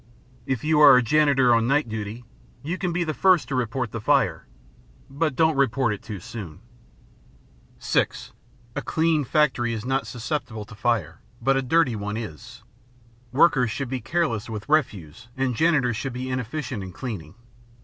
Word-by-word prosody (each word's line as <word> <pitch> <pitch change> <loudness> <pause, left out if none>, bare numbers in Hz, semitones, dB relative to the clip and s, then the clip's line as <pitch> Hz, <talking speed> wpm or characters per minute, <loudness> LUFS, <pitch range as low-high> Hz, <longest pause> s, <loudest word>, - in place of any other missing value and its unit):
If 130 -4 -2
you 155 0 +2
are 140 -4 +9
a 125 - +3
janitor 140 -2 +4
on 115 0 +2
night 145 +1 +2
duty, 110 +2 -6 0.4
you 170 +6 -3
can 180 -2 -1
be 175 +1 0
the 155 -2 -2
first 185 0 +3
to - - -3
report 125 -1 -2
the 115 - -5
fire, 115 - +1 0.6
but 150 0 -1
don't 160 0 +3
report 130 -4 +1
it 105 - -7
too 105 -3 -7
soon. 110 -8 -8 1.2
(6) - - -1 0.4
A - - -2
clean 160 -2 +1
factory 130 -4 +1
is 110 0 -5
not 135 +1 -1
susceptible 120 -3 -4
to 105 - -13
fire, 110 -6 -1 0.2
but 135 +3 +2
a 135 - +1
dirty 135 -1 +2
one 105 0 -4
is. 95 - -8 0.7
Workers 130 -3 +4
should 135 +3 -4
be 130 -1 -3
careless 115 -4 -1
with 105 -2 -6
refuse 110 - -1
and 130 -1 0
janitors 135 -7 +2
should 135 +1 -4
be 130 +1 -4
inefficient 130 -1 -4
in 95 -1 -7
cleaning. 100 - -7
125 Hz, 170 wpm, -24 LUFS, 110-145 Hz, 1.2 s, are